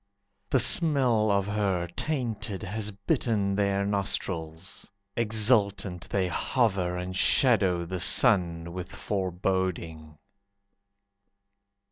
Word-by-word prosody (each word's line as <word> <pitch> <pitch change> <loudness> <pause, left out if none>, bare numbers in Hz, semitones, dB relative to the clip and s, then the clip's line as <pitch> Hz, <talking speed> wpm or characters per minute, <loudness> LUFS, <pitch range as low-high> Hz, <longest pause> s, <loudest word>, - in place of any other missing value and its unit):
The 130 - +2
smell 130 -9 +5
of 100 -1 +1
her, 100 -4 -1
tainted, 115 -9 -3
Has 105 +2 -3
bitten 100 0 -1
their 100 0 0
nostrils. 95 -2 -4 0.3
Exultant 105 -5 0
they 95 -2 -1
hover, 95 -3 -1
And 90 +1 -6
shadow 95 -6 +2
the 90 +1 -5
sun 85 -6 +2
with 90 0 -7
Foreboding. 90 -5 -3
100 Hz, 90 wpm, -26 LUFS, 90-110 Hz, 0.3 s, smell